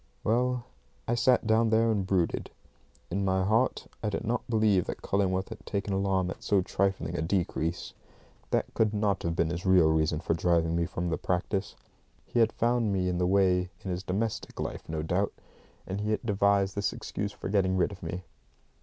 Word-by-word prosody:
Well, 125 +2 +1 0.4
I 120 - +1
sat 120 +1 +3
down 110 +1 +3
there 115 +1 +3
and 100 -3 -1
brooded. 90 -3 0 0.6
In 100 +3 0
my 95 -1 +2
heart 110 +6 +1 0.2
I 110 - 0
did 105 - -3
not 115 +2 0
believe 110 -5 +3
that - - -6
Cullingworth 95 -1 0
had - - -9
taken 100 -1 -2
alarm 95 -2 +1
at - - -9
so 100 -3 +2
trifling 95 -2 -1
a 85 - -1
decrease. 85 -1 -1 0.6
That - - 0
could 110 -1 +1
not 105 -1 +1
have 85 -1 -1
been 85 0 +1
his 85 +1 -4
real 90 -4 +5
reason 80 0 +1
for - - 0
driving 85 0 +2
me 85 0 +1
from 85 0 -3
the 80 - -1
practice. 95 +2 -1 0.5
He 120 - -1
had 115 -1 +4
found 120 -2 +1
me 90 -2 +1
in 90 -1 -1
the 90 - +2
way 90 -1 +3
in 95 - -3
his 90 +1 -2
domestic 100 +4 -3
life, - - -5
no 80 -1 -2
doubt, 90 +5 0 0.5
and 95 +2 -4
he 105 - -2
had 110 +2 -1
devised 100 -2 +2
this 100 0 0
excuse 100 0 -4
for - - -7
getting 95 -1 +2
rid 90 +3 +2
of 95 - -10
me. 85 +2 -5
95 Hz, 200 wpm, -29 LUFS, 90-105 Hz, 0.6 s, real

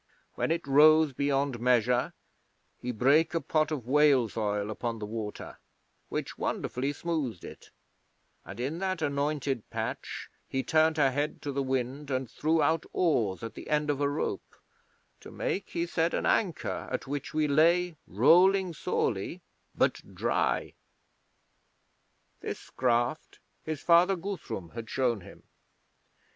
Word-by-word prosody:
When - - -1
it 165 0 -1
rose 155 +1 +6
beyond 140 -2 0
measure 125 0 +2 0.7
he 125 - -3
brake 140 +8 +3
a - - +3
pot 155 -2 +1
of 145 -7 -4
whale's 135 -4 +3
oil 105 -1 -1
upon 115 +2 -3
the 105 - -5
water, 105 -1 -6 0.5
which - - -4
wonderfully 135 +3 -2
smoothed 145 - -3
it, - - -11 0.7
and - - -10
in 140 +7 -2
that 185 -3 -2
anointed 140 -4 -1
patch - - -5 0.2
he 130 0 -1
turned 160 0 +3
her 135 -3 +4
head 145 +3 -2
to 145 - -2
the 140 0 -1
wind 135 +2 -2
and 130 -1 -1
threw 155 +6 +1
out 160 +2 +2
oars 115 - +1
at 115 - -5
the - - -10
end 150 0 +1
of 145 0 -3
a 140 - +2
rope, 145 +2 -3 0.6
to - - -12
make, 195 - -3
he 170 0 -1
said, 165 0 0
an - - -1
anchor 185 -7 0
at - - -3
which 140 0 -4
we 155 -1 +2
lay 170 +4 +3
rolling 180 - +4
sorely, - - -2 0.3
but - - +1
dry. - - 0 1.7
This - - -7
craft 120 +4 0 0.3
his 155 -2 -4
father 175 +3 +5
Guthrum 175 - -5
had 115 -1 -7
shown 125 -5 0
him. - - -14
145 Hz, 145 wpm, -29 LUFS, 125-160 Hz, 1.7 s, rose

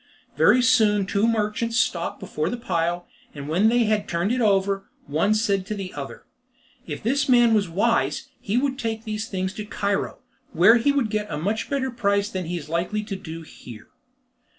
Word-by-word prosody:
Very 255 - +5
soon 215 -5 +4
two 200 +3 +1
merchants 230 +1 0
stopped - - 0
before - - -3
the 245 - -3
pile, 175 -5 -1 0.3
and 140 -1 -7
when 185 +8 +3
they 240 +1 +3
had 215 -2 0
turned 170 +5 0
it 250 0 0
over, 195 -2 +1 0.2
one 160 +9 +1
said 200 -3 +1
to 215 - -3
the 195 -2 -6
other: - - -8 0.6
"If - - -6
this 275 +4 +1
man 240 -2 +5
was 200 -4 +2
wise 230 +7 +1
he 210 +4 -1
would 270 +1 0
take 225 -2 -3
these 215 0 -4
things 185 -1 -3
to 215 - -5
Cairo, 205 -1 -2 0.4
where 190 +8 +6
he 240 +5 +2
would 270 -7 0
get 210 -1 -2
a 150 - -2
much 205 +8 -2
better 265 -2 -1
price 200 -3 0
than 185 -4 -4
he 175 +2 -3
is 150 -3 -8
likely 175 +6 -1
to 205 -2 -5
do 165 -4 -8
here." 120 -7 -12
210 Hz, 195 wpm, -24 LUFS, 185-230 Hz, 0.6 s, where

